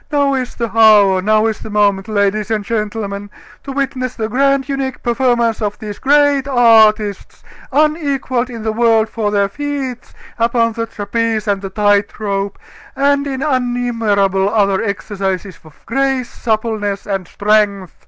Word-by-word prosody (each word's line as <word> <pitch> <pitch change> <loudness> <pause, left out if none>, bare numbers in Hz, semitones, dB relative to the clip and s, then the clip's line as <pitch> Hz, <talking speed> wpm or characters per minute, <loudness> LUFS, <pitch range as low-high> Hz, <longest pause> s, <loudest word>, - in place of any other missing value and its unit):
Now 285 -1 +2
is 255 -2 -3
the 230 -2 -4
hour, 205 -4 +5
now 215 +2 +2
is 220 -1 -1
the - - -9
moment, 205 -2 +1
ladies 210 0 0
and 215 -2 -1
gentlemen, 205 -2 -3 0.3
to 275 - -6
witness 260 -2 -3
the 220 -1 -3
grand, 275 +2 +1
unique 270 -2 -4
performance 235 -2 +1
of 210 -1 -2
these 210 -2 -8
great 285 -1 +3
artists, 220 -5 +3 0.3
unequaled 280 -4 0
in 230 -3 -7
the 220 -1 -1
world 225 -1 +2
for 220 -2 -2
their 200 -1 +1
feats 270 +1 -5 0.2
upon 230 0 +1
the 230 +1 -3
trapeze 220 +1 -2
and 200 -1 0
the 195 - -5
tight 205 +1 +1
rope, 200 -1 -2 0.4
and 280 +1 +1
in 270 -1 -3
innumerable 230 -7 0
other 200 -3 +1
exercises 195 -3 -4
of 155 -4 -18
grace, 265 0 -1
suppleness, 215 -3 -2
and 195 -3 -3
strength!" 205 -2 0
220 Hz, 150 wpm, -16 LUFS, 205-255 Hz, 0.4 s, hour